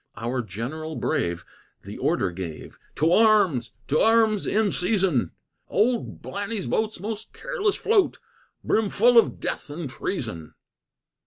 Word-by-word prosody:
Our 120 Hz, +2 st, -2 dB
General 125 Hz, -, -5 dB
brave 85 Hz, -, -1 dB, 0.4 s
the -, -, -9 dB
order 90 Hz, -, +1 dB
gave, 85 Hz, -3 st, -8 dB, 0.2 s
"To 160 Hz, +3 st, +2 dB
arms! 190 Hz, -, +4 dB, 0.2 s
To 150 Hz, -, +2 dB
arms, 220 Hz, -2 st, +3 dB
in 210 Hz, -1 st, +2 dB
season! 180 Hz, -, +1 dB, 0.4 s
Old 230 Hz, +3 st, 0 dB
Blanny's 200 Hz, +1 st, -4 dB
boats 215 Hz, -4 st, -1 dB
most 210 Hz, +2 st, -6 dB
careless -, -, -1 dB
float, 420 Hz, -3 st, +2 dB, 0.5 s
Brim 220 Hz, -2 st, +1 dB
full 235 Hz, +4 st, +6 dB
of -, -, 0 dB
death -, -, -4 dB
and 155 Hz, +1 st, -5 dB
treason!" 115 Hz, -, -5 dB
190 Hz, 130 wpm, -25 LUFS, -, 0.5 s, full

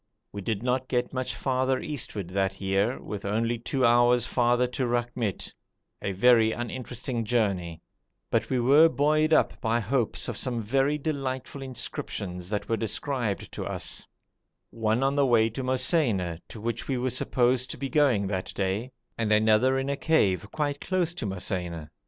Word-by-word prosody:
We 100 Hz, -, -6 dB
did 110 Hz, +2 st, -2 dB
not 130 Hz, +1 st, 0 dB
get 125 Hz, 0 st, -1 dB
much 130 Hz, -1 st, -2 dB
farther 130 Hz, 0 st, 0 dB
eastward 105 Hz, -, -4 dB
that 95 Hz, 0 st, -1 dB
year, 100 Hz, +5 st, 0 dB, 0.2 s
only 115 Hz, +3 st, 0 dB
two 130 Hz, +2 st, 0 dB
hours 120 Hz, 0 st, +4 dB
farther 120 Hz, 0 st, +2 dB
to 125 Hz, +1 st, -2 dB
Rakhmit, 120 Hz, -3 st, -2 dB, 0.5 s
a 100 Hz, -, -2 dB
very 115 Hz, +2 st, +5 dB
uninteresting 120 Hz, 0 st, -4 dB
journey, 100 Hz, -8 st, -1 dB, 0.5 s
but -, -, +1 dB
we 130 Hz, -, +1 dB
were 145 Hz, +7 st, +6 dB
buoyed 155 Hz, +1 st, +2 dB
up -, -, +3 dB
by 115 Hz, -1 st, +1 dB
hopes 120 Hz, +1 st, -1 dB
of 120 Hz, -4 st, -4 dB
some 125 Hz, -3 st, -1 dB
very 135 Hz, +6 st, +1 dB
delightful 140 Hz, -2 st, -3 dB
inscriptions 95 Hz, -8 st, -5 dB
that 105 Hz, -1 st, -2 dB
were 115 Hz, -, 0 dB
described 115 Hz, -1 st, -2 dB
to -, -, -5 dB
us: -, -, -4 dB, 0.6 s
one 110 Hz, +2 st, 0 dB
on 135 Hz, +1 st, +2 dB
the 145 Hz, -, +3 dB
way 115 Hz, -2 st, +4 dB
to 125 Hz, -, -4 dB
Mosaina, 130 Hz, -, +1 dB
to 110 Hz, -, -9 dB
which 115 Hz, +2 st, -3 dB
we 135 Hz, -, 0 dB
were 125 Hz, +1 st, -1 dB
supposed 125 Hz, 0 st, +1 dB
to -, -, -5 dB
be 140 Hz, -, -3 dB
going 135 Hz, -8 st, +3 dB
that 95 Hz, -1 st, -3 dB
day, 100 Hz, +6 st, -1 dB, 0.3 s
and 110 Hz, -2 st, 0 dB
another 110 Hz, +5 st, +4 dB
in 135 Hz, 0 st, -1 dB
a 140 Hz, 0 st, -1 dB
cave, 105 Hz, -, +2 dB
quite 145 Hz, -2 st, -2 dB
close 180 Hz, -3 st, 0 dB
to 135 Hz, -11 st, -4 dB
Mosaina. 90 Hz, -4 st, -4 dB
120 Hz, 165 wpm, -27 LUFS, 105-130 Hz, 0.6 s, were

